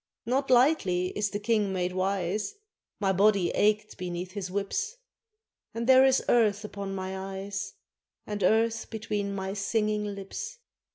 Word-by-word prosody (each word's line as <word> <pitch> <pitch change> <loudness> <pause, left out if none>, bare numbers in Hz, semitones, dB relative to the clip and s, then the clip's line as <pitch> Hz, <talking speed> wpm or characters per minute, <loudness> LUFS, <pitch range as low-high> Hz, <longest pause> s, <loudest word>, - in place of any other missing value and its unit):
Not 265 +3 0
lightly 240 - +3
is 210 -1 0
a - - +3
King 210 -2 +1
made 180 -1 -1
wise, 195 - -1 0.4
My 195 -2 +2
body 195 -1 +3
ached 210 0 +1
beneath 180 0 -4
his 190 -2 -5
whips, 200 - -2 0.8
And 230 +1 -2
there 260 +1 +7
is 265 0 +3
earth 210 -3 +3
upon 200 -2 -5
my 190 0 -4 0.2
eyes, 200 +1 -5 0.5
And 210 -1 -4
earth 225 +4 +2
between 210 -2 -3
my 190 0 -3
singing 210 +1 0
lips. 435 - -6
205 Hz, 145 wpm, -28 LUFS, 190-225 Hz, 0.8 s, there